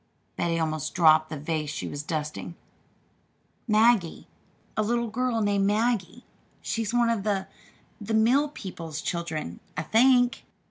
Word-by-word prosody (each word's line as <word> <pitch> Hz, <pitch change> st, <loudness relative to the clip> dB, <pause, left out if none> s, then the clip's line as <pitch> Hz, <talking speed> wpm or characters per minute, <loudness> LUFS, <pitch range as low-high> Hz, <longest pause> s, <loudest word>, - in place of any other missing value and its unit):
Betty 170 Hz, -1 st, 0 dB
almost 155 Hz, -2 st, -2 dB
dropped 155 Hz, -3 st, +5 dB
the 155 Hz, -, -5 dB
vase 150 Hz, 0 st, -3 dB
she 155 Hz, -, -4 dB
was 145 Hz, -, -5 dB
dusting. 155 Hz, +2 st, -4 dB, 1.1 s
"'Maggie,' 215 Hz, -5 st, +3 dB, 0.5 s
a -, -, +1 dB
little 235 Hz, +2 st, 0 dB
girl 240 Hz, 0 st, -1 dB
named 200 Hz, -1 st, +2 dB
'Maggie.' 220 Hz, 0 st, 0 dB, 0.3 s
She's 225 Hz, -1 st, -2 dB
one 240 Hz, -1 st, +3 dB
of 225 Hz, -3 st, -1 dB
the 195 Hz, -2 st, -1 dB, 0.6 s
the 220 Hz, +2 st, -1 dB
mill 255 Hz, +7 st, +3 dB
people's 170 Hz, -, -7 dB
children, 160 Hz, -, -4 dB, 0.2 s
I 155 Hz, -, -1 dB
think." 245 Hz, +6 st, +3 dB
200 Hz, 135 wpm, -26 LUFS, 160-230 Hz, 1.1 s, dropped